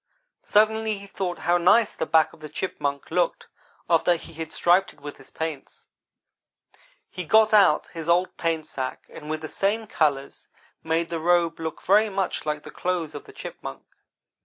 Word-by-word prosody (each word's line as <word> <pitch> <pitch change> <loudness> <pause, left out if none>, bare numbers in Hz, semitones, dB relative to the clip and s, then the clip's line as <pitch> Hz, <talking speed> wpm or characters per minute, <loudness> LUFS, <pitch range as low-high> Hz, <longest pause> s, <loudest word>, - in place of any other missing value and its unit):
Suddenly 220 0 +2
he 200 - -10
thought 185 -3 -4
how 175 0 +1
nice 205 +6 +4
the 160 - -3
back 160 -1 +3
of - - -16
the 155 0 -9
Chipmunk 140 -6 -3
looked - - 0 0.4
after 170 +1 +3
he 165 - -10
had 160 0 -6
striped 180 +3 +3
it - - -24
with 145 0 -8
his 135 - -15
paints. 160 -4 -6 1.2
He 180 - -6
got 220 +5 +4
out 195 -8 +5
his 165 -1 -5
old 180 +2 +2
paint 165 -2 -1
sack 130 -1 -5
and 150 - -10
with 155 0 -3
the 155 - -5
same 210 +7 -1
colors 145 -8 -1 0.4
made 165 +1 0
the 165 -1 -3
robe 170 0 +2
look 160 -1 -5
very 210 +3 +4
much 190 -5 -2
like 150 -1 -2
the - - -10
clothes 175 -4 -2
of 145 - -8
the - - -13
Chipmunk. 65 - -8
170 Hz, 180 wpm, -25 LUFS, 155-190 Hz, 1.2 s, out